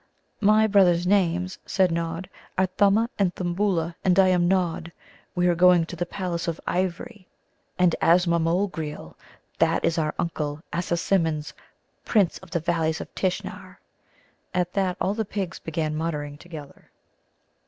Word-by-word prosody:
"My 215 Hz, +1 st, +5 dB
brothers' 185 Hz, -4 st, +4 dB
names," 185 Hz, -1 st, +1 dB
said 190 Hz, -2 st, +2 dB
Nod, 165 Hz, +2 st, -3 dB, 0.3 s
"are 190 Hz, -, +4 dB
Thumma 200 Hz, +5 st, +2 dB
and 185 Hz, -3 st, +1 dB
Thimbulla, 175 Hz, -2 st, -1 dB
and 185 Hz, -1 st, +3 dB
I 190 Hz, -1 st, +6 dB
am 175 Hz, -1 st, +3 dB
Nod. 175 Hz, -3 st, 0 dB, 0.4 s
We 180 Hz, 0 st, +1 dB
are 175 Hz, -, +4 dB
going 180 Hz, -1 st, +5 dB
to 175 Hz, -, -8 dB
the 175 Hz, +1 st, -3 dB
palace 175 Hz, -3 st, -3 dB
of 165 Hz, -1 st, -2 dB
ivory 185 Hz, +3 st, -3 dB, 0.5 s
and 180 Hz, -2 st, +3 dB
Azmamogreel 170 Hz, -, +1 dB, 0.5 s
that -, -, +2 dB
is 165 Hz, -, +1 dB
our 155 Hz, -1 st, -1 dB
Uncle 150 Hz, -2 st, -3 dB
Assasimmon's, 170 Hz, -2 st, 0 dB, 0.5 s
Prince 200 Hz, -6 st, +2 dB
of 190 Hz, -, -15 dB
the 170 Hz, 0 st, -1 dB
Valleys 160 Hz, -1 st, 0 dB
of -, -, -8 dB
Tishnar." 185 Hz, -1 st, -3 dB, 0.8 s
At 180 Hz, -1 st, 0 dB
that 190 Hz, -2 st, 0 dB
all 195 Hz, -, 0 dB
the 220 Hz, +1 st, -1 dB
pigs 195 Hz, -4 st, -4 dB
began 155 Hz, -1 st, -2 dB
muttering 150 Hz, -2 st, -3 dB
together. 155 Hz, -5 st, -11 dB
175 Hz, 145 wpm, -25 LUFS, 165-190 Hz, 0.8 s, I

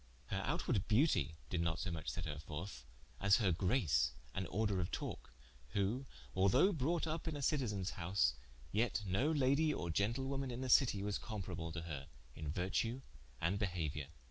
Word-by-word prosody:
Her 95 Hz, -, -1 dB
outward 130 Hz, -, 0 dB
beautie 105 Hz, -, +3 dB, 0.2 s
did 85 Hz, -, +1 dB
not 80 Hz, -1 st, +1 dB
so 95 Hz, -, -2 dB
much 80 Hz, -2 st, -3 dB
set 90 Hz, -, -3 dB
her 75 Hz, -2 st, -4 dB
forth, 75 Hz, -3 st, -6 dB, 0.3 s
as 100 Hz, 0 st, +6 dB
her 100 Hz, -5 st, +3 dB
grace 85 Hz, -, +2 dB, 0.2 s
and 95 Hz, -1 st, -2 dB
order 105 Hz, -1 st, 0 dB
of 85 Hz, -, -1 dB
talke, -, -, -5 dB, 0.4 s
who 110 Hz, +7 st, 0 dB, 0.3 s
although 110 Hz, -, +5 dB
brought 160 Hz, +3 st, +1 dB
vp 160 Hz, +1 st, -2 dB
in 155 Hz, -, -3 dB
a -, -, -5 dB
Citizen's 105 Hz, -, +1 dB
house, 85 Hz, -4 st, +2 dB, 0.4 s
yet 110 Hz, 0 st, +1 dB
no 100 Hz, -, +2 dB
Lady 145 Hz, +1 st, +3 dB
or 85 Hz, -, -2 dB
gentlewoman 130 Hz, +8 st, 0 dB
in 120 Hz, +1 st, -4 dB
the 130 Hz, -, -2 dB
Citie, 115 Hz, -6 st, +5 dB
was 105 Hz, 0 st, -1 dB
comparable 90 Hz, -7 st, -4 dB
to 80 Hz, 0 st, -4 dB
her 70 Hz, -5 st, -5 dB, 0.3 s
in 75 Hz, +1 st, -5 dB
vertue 115 Hz, -, -1 dB, 0.4 s
and 90 Hz, +5 st, +1 dB
behauiour. 80 Hz, -8 st, -1 dB
100 Hz, 170 wpm, -37 LUFS, 85-130 Hz, 0.4 s, as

